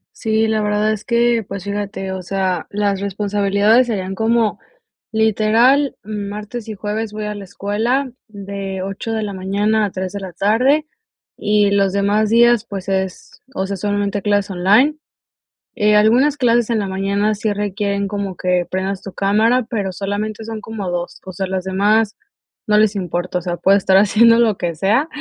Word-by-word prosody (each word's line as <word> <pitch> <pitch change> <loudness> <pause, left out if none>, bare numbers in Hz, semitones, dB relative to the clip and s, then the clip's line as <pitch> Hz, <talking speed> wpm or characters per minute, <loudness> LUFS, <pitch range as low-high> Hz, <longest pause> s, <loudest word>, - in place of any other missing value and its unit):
Sí, 220 0 +1
la 220 0 0
verdad 210 +1 +1
es 215 -1 -5
que, 235 -1 +2
pues, 195 -1 -6
fíjate, 200 -1 -4
o 190 - -5
sea, 185 -2 -2
las 200 -1 -1
responsabilidades 205 +3 +2
serían 195 -5 -3
como, 225 +1 +1 0.5
literal, 225 +5 +3
martes 210 +2 -6
y 215 - -5
jueves 210 +2 -3
voy 210 0 -5
a 210 0 -4
la 205 - -7
escuela, 225 +8 -1 0.2
de 195 -2 -6
8 195 +4 -5
de 220 -1 -1
la 205 -1 -4
mañana 205 +3 0
a 200 - -4
3 185 0 -4
de 200 - -5
la 185 -2 -7
tarde, 250 - +2 0.5
y 210 -1 +2
los 195 -1 +2
demás 205 +2 +1
días, 235 0 +4
pues, 195 -2 -6
es, 190 -1 -3
o 190 -5 -2
sea, 200 - -3
solamente 205 +1 -1
clases 205 0 0
online. 205 +11 +3 0.8
Eh, 210 0 +3
algunas 240 +8 +4
clases 240 -4 +2
en 230 -2 +1
la 200 - -2
mañana 200 +2 0
sí 210 +1 -1
requieren 200 -1 -2
como 200 -2 -4
que 180 -1 0
prendas 190 +1 -2
tu 195 - -9
cámara, 220 +5 +2
pero 200 -6 -2
solamente 205 +3 -4
son 220 -1 -6
como 210 -3 -5
2, 175 0 -4
o 190 - -7
sea, 190 +2 -3
las 190 0 -2
demás 205 +3 +1 0.5
no 210 0 +4
les 215 -1 +3
importa, 180 -1 -2
o - - -3
sea, 175 0 -3
puedo 195 +3 +3
estar 190 -1 +2
haciendo 230 +3 +5
lo 220 -4 +3
que 170 -2 -3
sea 210 - +1
205 Hz, 180 wpm, -18 LUFS, 195-220 Hz, 0.8 s, haciendo